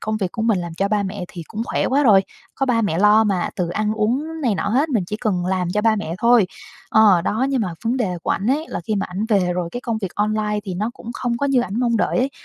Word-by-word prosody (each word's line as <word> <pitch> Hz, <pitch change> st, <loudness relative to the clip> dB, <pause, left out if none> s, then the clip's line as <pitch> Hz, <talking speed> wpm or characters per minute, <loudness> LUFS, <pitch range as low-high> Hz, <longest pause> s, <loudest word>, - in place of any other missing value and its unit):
công 215 Hz, 0 st, -2 dB
việc 190 Hz, -4 st, -2 dB
của 225 Hz, -, -3 dB
mình 225 Hz, -4 st, +2 dB
làm 170 Hz, -2 st, -5 dB
cho 195 Hz, +4 st, 0 dB
ba 210 Hz, 0 st, +1 dB
mẹ 190 Hz, -1 st, -4 dB
thì 175 Hz, -, -8 dB
cũng 220 Hz, +1 st, -4 dB
khỏe -, -, -1 dB
quá 280 Hz, +3 st, +2 dB
rồi, 205 Hz, -7 st, +6 dB, 0.3 s
có 270 Hz, -, -1 dB
ba 235 Hz, -3 st, +2 dB
mẹ 185 Hz, -6 st, 0 dB
lo 210 Hz, +2 st, +5 dB
mà, 195 Hz, -4 st, 0 dB
từ 180 Hz, -2 st, -1 dB
ăn 210 Hz, +4 st, -1 dB
uống 270 Hz, +10 st, -1 dB
này 235 Hz, -6 st, +2 dB
nọ -, -, -2 dB
hết, 265 Hz, +9 st, +2 dB
mình 230 Hz, -10 st, 0 dB
chỉ 210 Hz, -, -4 dB
cần 200 Hz, -6 st, -1 dB
làm 185 Hz, -1 st, 0 dB
cho 210 Hz, -, +2 dB
ba 220 Hz, -1 st, +3 dB
mẹ 170 Hz, -6 st, -4 dB
thôi. 235 Hz, -3 st, +4 dB, 0.4 s
Ờ, 205 Hz, -6 st, +5 dB
đó, 220 Hz, +8 st, 0 dB
nhưng 270 Hz, -2 st, 0 dB
mà 180 Hz, -6 st, -2 dB
vấn 235 Hz, +3 st, +1 dB
đề 190 Hz, -8 st, -1 dB
của -, -, -2 dB
ảnh 200 Hz, -, -1 dB
ấy 300 Hz, +4 st, 0 dB
là -, -, -4 dB
khi 215 Hz, -, -1 dB
mà 195 Hz, -, -1 dB
ảnh 185 Hz, +4 st, -3 dB
về 190 Hz, -5 st, +2 dB
rồi 175 Hz, -1 st, -2 dB
cái 245 Hz, -, -4 dB
công 230 Hz, -3 st, -2 dB
việc 195 Hz, -4 st, -5 dB
online 210 Hz, 0 st, 0 dB
thì 185 Hz, -, -4 dB
nó 210 Hz, +6 st, -2 dB
cũng 230 Hz, -, -9 dB
không 240 Hz, 0 st, -2 dB
có 280 Hz, -, -1 dB
như 270 Hz, -3 st, +3 dB
ảnh 220 Hz, 0 st, -3 dB
mong 235 Hz, -2 st, +2 dB
đợi -, -, +1 dB
ấy. 260 Hz, +2 st, +1 dB
215 Hz, 295 wpm, -21 LUFS, 190-235 Hz, 0.4 s, rồi